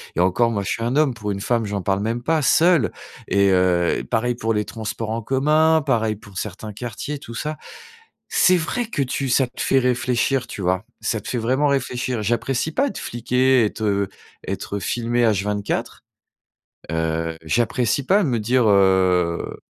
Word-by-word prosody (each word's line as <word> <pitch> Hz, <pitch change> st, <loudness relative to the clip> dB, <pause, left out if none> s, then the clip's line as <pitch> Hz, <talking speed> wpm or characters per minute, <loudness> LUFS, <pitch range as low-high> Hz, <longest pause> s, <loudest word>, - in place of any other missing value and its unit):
et -, -, -2 dB
encore, 105 Hz, +6 st, +3 dB
moi, 100 Hz, -3 st, -2 dB
je -, -, -4 dB
suis 115 Hz, -, -2 dB
un 120 Hz, +3 st, -1 dB
homme 150 Hz, -4 st, +3 dB
pour 105 Hz, -3 st, -4 dB
une 100 Hz, 0 st, -4 dB
femme, 115 Hz, 0 st, 0 dB
j'en 100 Hz, -1 st, -3 dB
parle 95 Hz, +1 st, 0 dB
même 115 Hz, +3 st, -2 dB
pas, 160 Hz, 0 st, +1 dB
seule 165 Hz, -1 st, +4 dB, 0.4 s
et 100 Hz, 0 st, +3 dB
heu, 90 Hz, -2 st, +2 dB
pareil 120 Hz, +1 st, 0 dB
pour 115 Hz, -1 st, -1 dB
les 105 Hz, -, 0 dB
transports 110 Hz, 0 st, -5 dB
en 115 Hz, +1 st, -2 dB
commun, 155 Hz, +6 st, +3 dB
pareil 110 Hz, -5 st, +1 dB
pour 100 Hz, -2 st, -14 dB
certains 105 Hz, +1 st, -5 dB
quartiers, 125 Hz, +6 st, -5 dB
tout 115 Hz, -, -10 dB
ça. 155 Hz, +3 st, -4 dB, 0.7 s
C'est 185 Hz, 0 st, +4 dB
vrai 220 Hz, +8 st, -2 dB
que 145 Hz, -, -2 dB
tu 135 Hz, +1 st, -2 dB
ça 125 Hz, +2 st, +3 dB
te 125 Hz, -, -11 dB
fait 135 Hz, -, +3 dB
réfléchir, 125 Hz, +1 st, 0 dB
tu 100 Hz, -, -7 dB
vois? 95 Hz, +3 st, 0 dB, 0.2 s
Ça 110 Hz, -, -1 dB
te -, -, -10 dB
fait 125 Hz, -, -1 dB
vraiment 130 Hz, +6 st, +1 dB
réfléchir. 125 Hz, -4 st, -1 dB
J'apprécie 120 Hz, +6 st, -1 dB
pas 280 Hz, -, +1 dB
être -, -, -5 dB
fliquer, 125 Hz, +1 st, +2 dB
être, 110 Hz, +1 st, -3 dB
heu, 100 Hz, -2 st, +1 dB, 0.4 s
être 100 Hz, -, -4 dB
filmé 120 Hz, +4 st, 0 dB
H24. 105 Hz, -1 st, -1 dB, 0.9 s
Heu, 80 Hz, 0 st, -1 dB
j'apprécie 120 Hz, -, 0 dB
pas, 200 Hz, +2 st, +4 dB
me 125 Hz, -5 st, 0 dB
dire, 120 Hz, +3 st, +2 dB
heu, 95 Hz, -3 st, +2 dB
115 Hz, 180 wpm, -22 LUFS, 100-130 Hz, 0.9 s, seule